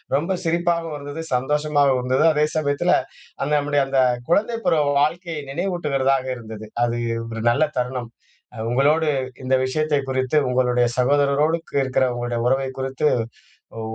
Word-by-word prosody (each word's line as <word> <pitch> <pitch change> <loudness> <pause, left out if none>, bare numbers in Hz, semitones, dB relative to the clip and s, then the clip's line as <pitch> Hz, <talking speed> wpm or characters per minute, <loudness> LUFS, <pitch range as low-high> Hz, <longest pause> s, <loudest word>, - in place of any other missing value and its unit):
ரொம்ப 170 +6 0
சிரிப்பாவும் 170 -1 0
இருந்தது. 145 +3 -6
சந்தோஷமாவும் 145 +1 +2
இருந்தது. 130 +4 +1
அதே 150 0 +2
சமயத்துல, 150 +3 +1 0.5
அந்த 140 - -1
நம்முடைய 145 -1 +1
அந்த 135 -1 +2 0.3
குழந்தை 215 +6 +2
பருவ 160 -4 +3 0.2
வாழ்க்கையை 165 +1 -1
நினைவூட்டுகிறதா 145 -6 0 0.2
இருந்தது. 110 -2 -9 0.2
அது 120 0 -2 0.3
ஒரு 115 -1 -5
நல்ல 140 +6 +2 0.2
தருணம். 125 -1 -3 0.5
அ, - - -11
உங்களோடு 150 +5 +3 0.4
இந்த 130 +1 +3
விஷயத்தை 150 +2 0
குறித்து 130 +3 +1
உங்களுடைய 125 -1 +2
சகோதரரோடு 145 +4 +2 0.2
இருக்குற 130 0 +1
உங்களுடைய 120 -1 -2
உறவை 135 +1 +1
குறித்து, 135 +3 0 0.7
உ, - - -4
140 Hz, 135 wpm, -22 LUFS, 130-155 Hz, 0.7 s, பருவ